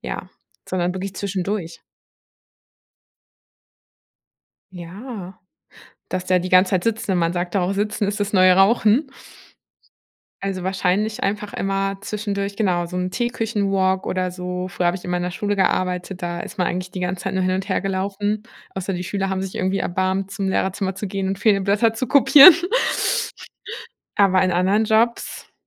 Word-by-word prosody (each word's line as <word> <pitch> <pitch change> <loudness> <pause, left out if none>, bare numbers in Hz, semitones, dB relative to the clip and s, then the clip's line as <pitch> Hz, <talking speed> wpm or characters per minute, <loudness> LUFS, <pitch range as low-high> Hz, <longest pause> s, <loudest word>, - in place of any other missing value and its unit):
ja, 60 0 -6 0.4
sondern 180 -1 -1
wirklich 190 +1 -5
zwischendurch. 190 -3 -3 2.9
Ja, 185 +2 -9 0.7
dass 185 0 -3
der 185 0 +3
die 180 +1 -4
ganze 185 +1 +5
Zeit 185 -2 0
sitzt, 225 -2 -1
wenn 185 -2 +1
man 170 0 +1
sagt 175 0 -3
da 195 - +2
auch 180 - 0
sitzen 205 +1 -1
ist 205 +1 -3
das 205 +1 -1
neue 185 -1 +6
Rauchen. 220 +7 +4 1.4
Also, 190 -2 -3
wahrscheinlich 190 +4 0
einfach 210 +1 -2
immer 195 0 -1
zwischendurch, 200 -1 -3
genau, 180 -5 0
so 180 +1 -7
'n 180 0 -2
Teeküchen-walk 200 -5 0
oder 185 -1 -1
so. 180 0 -5
Früher 180 -1 -2
habe 175 +1 +1
ich 180 - -12
immer 180 0 -1
in 175 - -2
der 180 - -3
Schule 205 +2 -2
gearbeitet, 185 -1 -1
da 175 0 -3
ist 195 - -8
man 180 - +2
eigentlich 185 +1 -4
die 185 - -5
ganze 180 +1 -3
Zeit 190 0 -2
nur 190 - +1
hin 185 0 +1
und 195 +2 -5
her 190 - 0
gelaufen, 200 +2 -2 0.3
außer 190 0 -4
die 180 0 -3
Schüler 195 +1 -2
haben 190 0 -2
sich 190 - -6
irgendwie 190 +1 0
erbarmt, 190 +2 -1
zum 195 -1 -3
Lehrerzimmer 190 0 -1
zu 195 +1 -5
gehen 195 0 -3
und 195 0 -3
fehlende 200 -3 +3
Blätter 210 +3 +2
zu 245 +3 -3
kopieren. 290 +5 +9 1.6
Aber 190 -2 +4
in 185 - +1
anderen 195 +5 +2
Jobs 225 +2 0
190 Hz, 170 wpm, -21 LUFS, 185-205 Hz, 2.9 s, kopieren